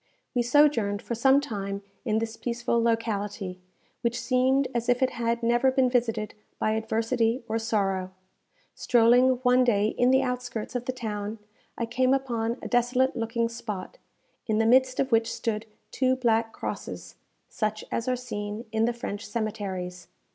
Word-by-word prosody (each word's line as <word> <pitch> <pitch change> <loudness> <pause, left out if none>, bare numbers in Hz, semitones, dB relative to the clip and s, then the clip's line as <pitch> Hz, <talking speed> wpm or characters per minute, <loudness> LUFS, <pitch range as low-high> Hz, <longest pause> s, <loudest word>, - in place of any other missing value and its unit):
We 245 - +2
sojourned 240 -6 +3
for 235 - -5
some 265 +4 +4
time 200 -6 -4 0.2
in 220 -2 +1
this 225 0 -2
peaceful 235 0 -1
locality, 205 -5 -1 0.4
which 235 0 0
seemed 260 +1 +2
as 235 0 -1
if 245 +1 +3
it 260 - +2
had 235 0 -1
never 240 +3 +3
been 260 -1 +2
visited 230 -4 0 0.2
by 215 - +1
adversity 225 +2 0
or 225 - -1
sorrow. 195 -4 0 0.6
Strolling 245 +2 +4
one 250 0 +5
day 215 -4 +2
in 245 +2 +2
the 265 +1 +4
outskirts 250 -3 -4
of 245 0 -2
the 255 - 0
town, 215 -3 -4 0.4
I 235 - -1
came 255 +3 +2
upon 235 -3 -2
a - - -3
desolate 250 +2 +2
looking 230 0 0
spot, 230 - -6 0.5
in 215 -2 +1
the 225 - +3
midst 255 +2 +4
of 270 -1 0
which 225 0 +3
stood 225 -1 -3 0.2
two 260 -1 +2
black 230 -3 +1
crosses, - - -6 0.3
such 215 -1 -3
as 230 - -2
are 255 - +2
seen 210 -2 -5
in 220 0 +2
the 240 - 0
French 220 -3 -5
cemeteries. 195 -5 -4
230 Hz, 160 wpm, -27 LUFS, 215-250 Hz, 0.6 s, one